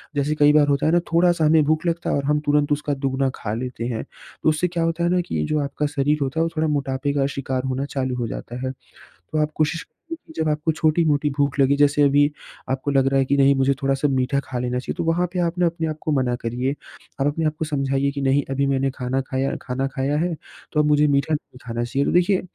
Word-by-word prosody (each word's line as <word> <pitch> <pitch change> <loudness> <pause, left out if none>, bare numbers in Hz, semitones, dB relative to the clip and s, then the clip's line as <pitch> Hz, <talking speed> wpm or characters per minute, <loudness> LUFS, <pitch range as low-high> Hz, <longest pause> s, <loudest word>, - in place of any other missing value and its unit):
जैसे 145 +2 0
कई 150 -1 +5
बार 150 -1 +5
होता 140 0 +1
है 155 - +3
ना 175 - +4
थोड़ा-सा 170 -1 +3
हमें 155 0 +5
भूख 155 +2 +1
लगता 170 0 -1
है - - +1
और 140 - -1
हम 150 +1 +2
तुरंत 145 0 +2
उसका 145 0 0
दुगना 135 -1 0
खा 105 - -4
लेते 120 0 -4
हैं। 115 -3 -3
तो - - -4
उससे 155 +3 +1
क्या 170 -1 -2
होता 165 +1 -1
है 170 - +2
ना 180 0 +2
कि 80 - -2
जो 155 - +1
आपका 140 +1 -2
शरीर 145 +1 +1
होता 140 +3 -1
है - - +3
वो 165 - 0
थोड़ा 160 +1 +2
मोटापे 140 -1 -1
का 140 -1 +1
शिकार 130 -1 -2
होना 130 +1 -2
चालू 130 -3 -2
हो 120 -2 -2
जाता 120 +2 -6
है। 130 - -1 0.4
तो 90 - -7
आप 150 0 0
कोशिश 160 +2 0
करिए 330 0 -11
कि 320 - -13
जब 155 - +1
आपको 150 +2 0
छोटी-मोटी 155 -2 +2
भूख 140 -1 +1
लगी 135 +1 +4
जैसे 145 0 +3
अभी 145 +1 +4 0.4
आपको 135 +2 -1
लग 135 -1 +3
रहा 135 0 +2
है 135 - +2
कि 140 - +1
नहीं 140 0 +5
मुझे 135 +1 +2
थोड़ा-सा 135 +1 +1
मीठा 130 +1 +1
खा 125 - -4
लेना 125 0 -1
चाहिए 125 - -5
तो - - -1
वहाँ 170 +2 +1
पे 180 - -1
आप 175 0 -1
न 180 - +4
अपने 165 -1 -1
आप 155 - -4
को 155 - -2
मना 130 -4 +1
करिए। 125 +3 -1 0.5
आप 140 - +3
अपने 155 +2 -1
आप 155 0 0
को 160 - -1
समझाइए 140 -2 0
कि 140 0 -5
नहीं 135 +1 +2
अभी 140 +1 0
मैंने 135 0 +1
खाना 130 0 -1
खाया 130 +1 -1
खाना 135 +1 -2
खाया 140 +2 0
है 170 +2 0 0.4
तो 150 - +2
अब 150 - +4
मुझे 150 0 +4
मीठा 140 +2 +1
नहीं 150 -4 -5
खाना 115 0 -3
चाहिए। 135 +4 -1
तो - - 0
देखिए 180 +2 +3
145 Hz, 260 wpm, -22 LUFS, 135-155 Hz, 0.5 s, कई